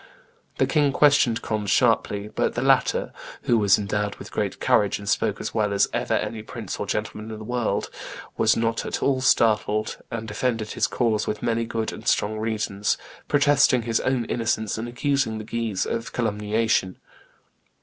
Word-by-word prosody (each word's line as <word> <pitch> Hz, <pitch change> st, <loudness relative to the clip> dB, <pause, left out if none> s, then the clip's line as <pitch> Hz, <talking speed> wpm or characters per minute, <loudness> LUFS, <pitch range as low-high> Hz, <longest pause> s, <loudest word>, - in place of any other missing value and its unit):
The -, -, +3 dB
king 145 Hz, -3 st, +2 dB
questioned 145 Hz, -5 st, +3 dB
Conde 105 Hz, -3 st, -2 dB
sharply; 105 Hz, -3 st, +2 dB
but -, -, -1 dB
the -, -, -1 dB
latter, -, -, +2 dB, 0.3 s
'who 120 Hz, -, +2 dB
was 100 Hz, -2 st, +5 dB
endowed 105 Hz, 0 st, -2 dB
with -, -, -11 dB
great -, -, -2 dB
courage, 100 Hz, -1 st, +2 dB
and 100 Hz, -, -10 dB
spoke -, -, 0 dB
as -, -, -4 dB
well 105 Hz, -2 st, +1 dB
as 100 Hz, 0 st, +3 dB
ever -, -, 0 dB
any 110 Hz, -1 st, -2 dB
prince 110 Hz, -2 st, -7 dB
or 105 Hz, -, -3 dB
gentleman 105 Hz, +1 st, -3 dB
in 110 Hz, -, -6 dB
the 110 Hz, -, -8 dB
world, 120 Hz, -3 st, -2 dB, 0.4 s
was 110 Hz, 0 st, +3 dB
not 115 Hz, 0 st, 0 dB
at -, -, -3 dB
all 135 Hz, -2 st, +2 dB
startled, 110 Hz, -4 st, +2 dB
and 115 Hz, -1 st, -5 dB
defended 110 Hz, 0 st, -2 dB
his -, -, +1 dB
cause 115 Hz, -4 st, 0 dB
with 105 Hz, -, -3 dB
many 115 Hz, 0 st, 0 dB
good 115 Hz, -1 st, -3 dB
and -, -, -9 dB
strong 110 Hz, +1 st, +1 dB
reasons,' 105 Hz, -2 st, -1 dB, 0.3 s
protesting 145 Hz, -4 st, +4 dB
his 115 Hz, 0 st, 0 dB
own 130 Hz, -3 st, 0 dB
innocence 110 Hz, -2 st, -1 dB
and 110 Hz, +2 st, -4 dB
accusing 125 Hz, -2 st, 0 dB
the 110 Hz, -, -6 dB
Guises 115 Hz, -3 st, -2 dB
of 115 Hz, 0 st, -3 dB
calumniation. 105 Hz, -3 st, 0 dB
110 Hz, 175 wpm, -24 LUFS, 105-120 Hz, 0.4 s, was